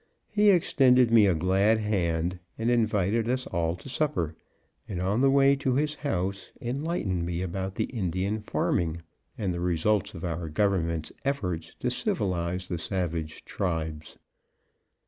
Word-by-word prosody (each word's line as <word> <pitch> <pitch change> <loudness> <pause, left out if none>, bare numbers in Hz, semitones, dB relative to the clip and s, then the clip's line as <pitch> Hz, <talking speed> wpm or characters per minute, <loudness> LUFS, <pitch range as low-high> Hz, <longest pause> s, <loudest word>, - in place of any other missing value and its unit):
He 210 -1 +4
extended 130 - +4
me 110 -3 +7
a 90 - +3
glad 95 +6 +3
hand, 90 -5 0 0.2
and 115 +2 +1
invited 110 -1 +1
us 130 0 0
all 85 -1 -1
to 90 - -13
supper, 135 - -1 0.5
and 95 - -3
on 100 +6 +1
the 135 - +5
way 140 0 +5
to 130 -2 0
his 150 +2 +1
house, 100 -10 -3
enlightened 120 - -2
me 85 +1 -2
about 95 +2 -4
Indian 100 -2 -1
farming, 85 -5 -1 0.3
and 95 -4 -1
the 85 - -3
results 90 +4 +1
of 80 - -5
our 85 -1 -3
Government's 85 -3 0
efforts 90 - -2
to - - 0
civilize 90 -1 -1
the 85 -3 -3
savage 85 -4 -3
tribes. 80 -5 -3
95 Hz, 145 wpm, -27 LUFS, 85-120 Hz, 0.5 s, me